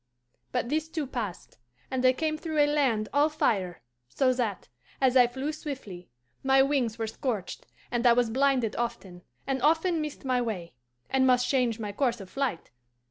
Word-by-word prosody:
"But 245 -1 -1
this 315 +2 -1
too 320 -2 -3
passed, 230 - -6 0.3
and 260 -1 -1
I 255 - +7
came 310 +3 -1
through 315 0 -4
a 295 - +6
land 265 -8 +1
all 290 +2 +4
fire, 190 - -1 0.3
so 255 - +2
that, 230 -6 -2 0.3
as 260 -1 +3
I 250 -2 +7
flew 265 +5 -3
swiftly, 265 - -7 0.3
my 270 0 +5
wings 265 -5 0
were 225 - -2
scorched, 220 -4 -4 0.2
and 240 0 +2
I 235 - +7
was 240 -1 +2
blinded 260 -3 +2
often, 190 -7 -4 0.2
and 265 -1 -1
often 325 +3 +2
missed 300 -2 -6
my 255 -1 +1
way, 195 -8 -4 0.3
and 260 0 +2
must 250 -1 +3
change 250 -5 +1
my 210 -3 -4
course 240 +1 0
of 190 -2 -10
flight. 270 -11 -2
255 Hz, 180 wpm, -28 LUFS, 225-280 Hz, 0.3 s, I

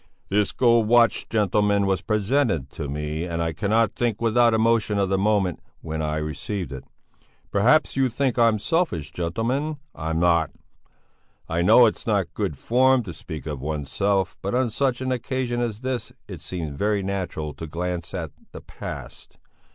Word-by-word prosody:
"This 105 0 +2
gold 115 -3 +3
watch, 120 -2 +4
gentlemen, 105 -1 +2
was 95 -1 +1
presented 105 - 0
to 75 - -5
me, 75 +2 -3
and 85 -1 -3
I 85 -1 -1
cannot 105 +7 +1
think 120 -3 -1
without 115 +1 +4
emotion 110 -2 +2
of 100 -1 +1
the 95 - +2
moment 100 -4 +1 0.2
when 80 0 -4
I 75 0 -1
received 75 +2 -4
it. 65 -2 -7 0.7
Perhaps 125 +10 +3
you 135 -1 +2
think 125 +1 0
I'm 115 -2 +4
selfish 105 - -1
gentlemen? 120 - -2 0.2
I'm 80 +1 -2
not. 85 -1 +3 1.0
I 85 +1 0
know 110 +7 +7
it's 110 - -1
not 100 -7 0
good 95 -9 -2
form 130 - +3
to 90 -5 -7
speak 80 0 -8
of 75 -4 -5
oneself, 80 +7 -1
but 100 +5 -2
on 125 -2 +1
such 130 +1 0
an 130 0 -1
occasion 125 -1 -2
as 115 -2 -3
this 130 -1 -3 0.2
it - - -8
seems 80 -5 -4
very 100 +5 0
natural 90 -6 -3
to 80 - -7
glance 85 +2 -3
at 80 -5 -4 0.2
the - - -8
past. - - -9
100 Hz, 165 wpm, -24 LUFS, 85-115 Hz, 1.0 s, know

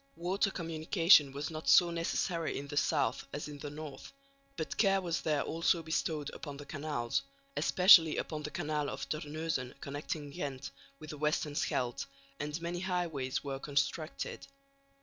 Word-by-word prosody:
Water 185 +4 0
communication 165 -3 +4
was 140 +3 -4
not 155 0 -3
so 175 -2 +7
necessary 170 0 -1
in 140 - -5
the 145 - -5
south 140 -5 +1
as 145 - -4
in 145 -1 -8
the 145 - -5
north, 150 -1 -8 0.5
but - - -3
care 195 -2 +4
was 175 -3 -2
there 150 -3 +1
also 165 +1 +1
bestowed 155 -2 -1
upon 145 -3 -7
the 145 - -9
canals, 145 -6 -2 0.3
especially 180 -4 +7
upon 155 -2 -3
the 150 - -4
canal 150 -1 -2
of 135 - -5
Terneuzen 155 -4 -3
connecting 145 +1 -5
Ghent 140 -5 -5 0.3
with 155 +1 -9
the 150 - -8
western 150 0 0
Scheldt, 125 -4 -1 0.3
and 150 +2 -3
many 170 +1 -3
highways 175 -8 -2
were 135 -2 -4
constructed. 150 +3 -2
155 Hz, 155 wpm, -33 LUFS, 145-165 Hz, 0.5 s, so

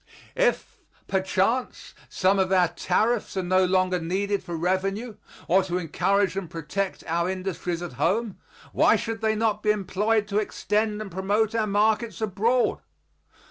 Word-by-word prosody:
If, - - 0 0.3
perchance, 195 +6 -1 0.2
some 195 +1 +2
of 190 0 +1
our 180 -3 +4
tariffs 220 +3 0
are 190 - 0
no 185 +1 +3
longer 185 0 +1
needed 195 +4 -1
for 175 -2 -5
revenue 195 +6 -1 0.3
or 185 +3 +4
to 180 -1 -2
encourage 190 +3 +1
and 195 -4 -4
protect 165 +4 -4
our 170 +2 0
industries 185 -2 -3
at 175 - -6
home, 205 +3 0 0.3
why - - +5
should 225 -1 -3
they 220 0 +1
not 215 -1 0
be 210 - 0
employed 210 +1 +1
to 205 +1 +1
extend 215 0 -1
and 195 - -10
promote 205 +4 0
our 220 -2 0
markets 215 +3 +1
abroad? 220 +4 +1
195 Hz, 150 wpm, -25 LUFS, 185-215 Hz, 0.3 s, why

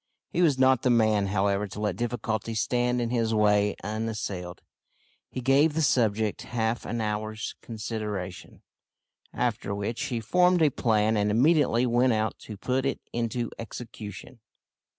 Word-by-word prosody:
He 175 - 0
was 150 -6 +4
not 130 -1 +4
the 125 - +2
man, 110 -4 +3
however, 100 +1 +1
to 100 - -8
let 105 -4 -1
difficulties 110 -1 -2
stand 125 +1 +1
in 120 -1 -1
his 115 -2 +1
way 105 -1 +3
unassailed. 105 -4 -4 0.7
He 130 - -5
gave 140 +5 +4
the 160 - +1
subject 110 -6 +1
half 115 -1 -2
an 120 - -2
hour's 110 +1 -3
consideration, 105 -5 -6 0.7
after 100 - -2
which 110 +7 -3
he 125 -5 -2
formed 180 - +3
a 150 - +4
plan 110 -3 +2
and 105 0 +1
immediately 125 +1 +3
went 120 +1 +3
out 110 0 0
to 105 - -8
put 130 +5 -1
it 135 - -1
into 120 0 -2
execution. 115 0 -8
115 Hz, 150 wpm, -27 LUFS, 105-125 Hz, 0.7 s, was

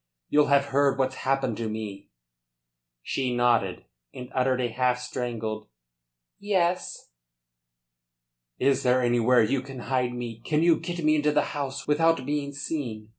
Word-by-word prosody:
You'll 150 0 +4
have 140 0 +4
heard 140 -1 +3
what's 130 -1 0
happened 135 -4 0
to 115 -2 -3
me?" 105 -2 -6 0.9
She 130 -2 -1
nodded, 120 -6 +1 0.3
and 125 +1 -9
uttered 130 -1 +1
a 125 - +1
half 125 +1 +1
strangled 115 -4 -4 0.7
"Yes." 180 - -1 1.5
"Is 140 -1 +2
there 125 0 +2
anywhere 120 0 +4
you 125 +4 0
can 135 0 -10
hide 125 -1 +1
me? 120 -2 -6
Can 150 +6 0
you 170 -1 +4
get 175 -2 -5
me 155 0 +4
into 150 0 +2
the 150 0 +2
house 140 -1 -4
without 160 -1 +2
being 145 0 -2
seen? 130 -7 -5
130 Hz, 145 wpm, -26 LUFS, 120-145 Hz, 1.5 s, You'll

